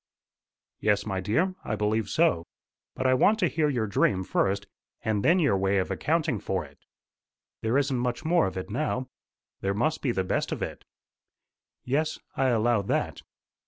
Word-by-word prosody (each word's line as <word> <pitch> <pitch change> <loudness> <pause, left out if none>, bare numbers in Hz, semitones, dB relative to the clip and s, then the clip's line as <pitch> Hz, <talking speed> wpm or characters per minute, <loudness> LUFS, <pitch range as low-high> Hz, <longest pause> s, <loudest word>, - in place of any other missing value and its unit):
"Yes, 105 -1 +2
my 95 -3 -2
dear; 165 - +1
I 110 - -2
believe 105 0 0
so. 160 - +2 0.5
But 130 - -3
I 130 - +5
want 205 +12 +4
to 185 - +2
hear 150 +1 +1
your 120 -6 0
dream 95 -2 +1
first, 100 +2 0 0.4
and 105 -2 0
then 170 +3 +5
your 145 - +3
way 95 +1 +1
of 95 - 0
accounting 155 -7 0
for 95 -4 -2
it." 70 0 -18 0.8
"There 115 +4 +1
isn't 140 -3 +1
much 120 +2 -2
more 165 - +3
of 95 - -5
it 95 +2 -5
now." 130 0 -1 0.5
"There 100 0 -1
must 155 +9 0
be 130 - +1
the 95 -5 0
best 90 - -1
of - - -2
it." - - -6 1.0
"Yes; 155 +5 0 0.2
I 135 - +2
allow 120 -2 +3
that. 100 - -1
120 Hz, 175 wpm, -27 LUFS, 100-145 Hz, 1.0 s, I